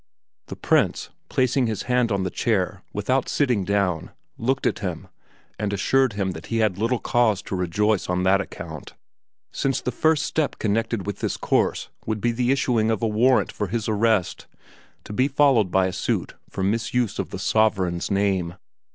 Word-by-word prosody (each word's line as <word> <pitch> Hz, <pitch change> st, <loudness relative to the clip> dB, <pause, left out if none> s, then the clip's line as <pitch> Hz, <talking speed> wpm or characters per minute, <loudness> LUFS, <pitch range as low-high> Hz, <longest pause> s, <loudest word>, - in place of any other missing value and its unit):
The -, -, -7 dB
Prince, -, -, +1 dB, 0.2 s
placing 130 Hz, 0 st, +2 dB
his 110 Hz, -3 st, -3 dB
hand 125 Hz, -2 st, +1 dB
on 100 Hz, -1 st, 0 dB
the 95 Hz, -, -2 dB
chair 100 Hz, -3 st, 0 dB
without 130 Hz, +6 st, 0 dB
sitting 125 Hz, -9 st, +1 dB
down, 95 Hz, -4 st, 0 dB, 0.3 s
looked 130 Hz, +3 st, -1 dB
at -, -, +1 dB
him, -, -, -5 dB, 0.5 s
and 105 Hz, -1 st, -1 dB
assured 130 Hz, +5 st, +2 dB
him 100 Hz, -2 st, -1 dB
that 80 Hz, -1 st, -9 dB
he 115 Hz, -, -1 dB
had 105 Hz, -4 st, +1 dB
little 115 Hz, +3 st, +1 dB
cause 115 Hz, -5 st, +1 dB
to -, -, -4 dB
rejoice 95 Hz, +3 st, 0 dB
on 90 Hz, 0 st, 0 dB
that 95 Hz, +1 st, +4 dB
account 80 Hz, -6 st, -9 dB, 0.6 s
since 135 Hz, -1 st, 0 dB
the 125 Hz, -, -3 dB
first 155 Hz, +4 st, +2 dB
step 155 Hz, -2 st, -1 dB
connected 110 Hz, -1 st, -1 dB
with 100 Hz, -1 st, -4 dB
this -, -, -2 dB
course -, -, 0 dB, 0.2 s
would 110 Hz, -1 st, -1 dB
be 120 Hz, +3 st, +1 dB
the 120 Hz, +1 st, -1 dB
issuing 125 Hz, -5 st, +1 dB
of 110 Hz, 0 st, -1 dB
a -, -, +3 dB
warrant 120 Hz, +5 st, +3 dB
for 105 Hz, -, -3 dB
his 110 Hz, +2 st, -2 dB
arrest, 110 Hz, -3 st, +1 dB, 0.6 s
to -, -, -8 dB
be 130 Hz, +5 st, +2 dB
followed 135 Hz, -8 st, +3 dB
by 95 Hz, +1 st, +3 dB
a 95 Hz, -, -2 dB
suit -, -, -2 dB, 0.2 s
for 95 Hz, -, -4 dB
misuse 115 Hz, +2 st, 0 dB
of -, -, -2 dB
the -, -, -6 dB
sovereign's 95 Hz, -6 st, +1 dB
name. 95 Hz, -3 st, 0 dB
110 Hz, 180 wpm, -24 LUFS, 95-120 Hz, 0.6 s, that